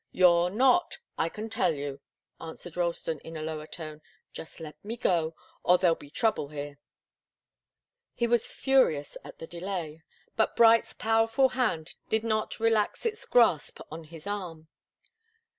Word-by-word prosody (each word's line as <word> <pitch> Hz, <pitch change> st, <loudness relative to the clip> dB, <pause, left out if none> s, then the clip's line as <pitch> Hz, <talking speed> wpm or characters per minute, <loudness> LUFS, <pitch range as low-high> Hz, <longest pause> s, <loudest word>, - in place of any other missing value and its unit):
"You're 175 Hz, -1 st, +5 dB
not, 260 Hz, -, +3 dB, 0.2 s
I 165 Hz, -, 0 dB
can 215 Hz, +5 st, -6 dB
tell 190 Hz, -7 st, +1 dB
you!" 140 Hz, -1 st, -5 dB, 0.4 s
answered 165 Hz, +1 st, -9 dB
Ralston, 170 Hz, -3 st, -1 dB
in 165 Hz, +2 st, -9 dB
a 155 Hz, -, -5 dB
lower 155 Hz, -1 st, -5 dB
tone. 155 Hz, -3 st, -8 dB, 0.3 s
"Just 160 Hz, -, -8 dB
let 155 Hz, -2 st, -10 dB
me 225 Hz, +3 st, -5 dB
go 165 Hz, -6 st, +1 dB, 0.3 s
or 180 Hz, -, +5 dB
there'll 175 Hz, -2 st, +4 dB
be 145 Hz, -, -14 dB
trouble 220 Hz, -4 st, +1 dB
here." 145 Hz, -1 st, -7 dB, 1.4 s
He 235 Hz, -, +1 dB
was 235 Hz, -1 st, +2 dB
furious 255 Hz, -, +2 dB
at -, -, -11 dB
the -, -, -8 dB
delay, 170 Hz, -2 st, -5 dB, 0.3 s
but 220 Hz, -, +1 dB
Bright's 230 Hz, 0 st, +5 dB
powerful 225 Hz, +4 st, +2 dB
hand 205 Hz, -12 st, -1 dB
did 220 Hz, 0 st, +1 dB
not 215 Hz, -1 st, -1 dB
relax 225 Hz, -, +1 dB
its 445 Hz, 0 st, -2 dB
grasp 225 Hz, -11 st, +3 dB
on 160 Hz, +1 st, -7 dB
his 160 Hz, 0 st, -12 dB
arm. 175 Hz, -6 st, -5 dB
175 Hz, 150 wpm, -28 LUFS, 160-225 Hz, 1.4 s, You're